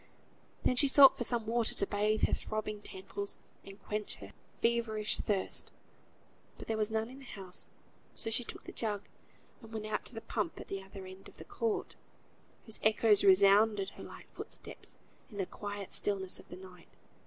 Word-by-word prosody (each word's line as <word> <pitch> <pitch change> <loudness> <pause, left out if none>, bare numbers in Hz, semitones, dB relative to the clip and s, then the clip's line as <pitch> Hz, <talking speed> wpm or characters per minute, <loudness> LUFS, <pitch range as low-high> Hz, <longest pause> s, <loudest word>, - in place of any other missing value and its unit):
Then 250 - +2
she 285 - +8
sought 270 0 +9
for - - -2
some 235 -2 0
water 230 0 +3
to - - +2
bathe 210 +2 +1
her - - 0
throbbing 215 -1 -3
temples, 200 +1 -5 0.3
and 195 +1 -11
quench 210 0 -3
her 100 0 -11 0.3
feverish 230 -2 +1
thirst. 200 -3 -1 0.9
There 225 - -3
was 215 0 +1
none 220 0 0
in 265 - -11
the 270 - -12
house, 190 -6 -4 0.5
so 225 - -3
she 245 - +1
took - - -9
the - - -8
jug 210 -3 -2 0.6
and 225 -2 -12
went 220 -1 -4
out 215 0 -1
to - - -1
the 225 - -5
pump 210 -5 -2
at - - -9
the 195 0 -3
other 190 0 -10
end 190 +1 -11
of - - -21
the - - -10
court, 445 -3 -2 0.7
whose 220 -2 -6
echoes 215 -1 +5
resounded 200 +1 +6
her - - -11
light - - -10
footsteps - - -5 0.3
in 205 - -10
the 195 - 0
quiet 205 0 -6
stillness 190 -2 0
of - - -15
the 180 - -8
night. 185 -2 -13
210 Hz, 185 wpm, -33 LUFS, 195-225 Hz, 0.9 s, sought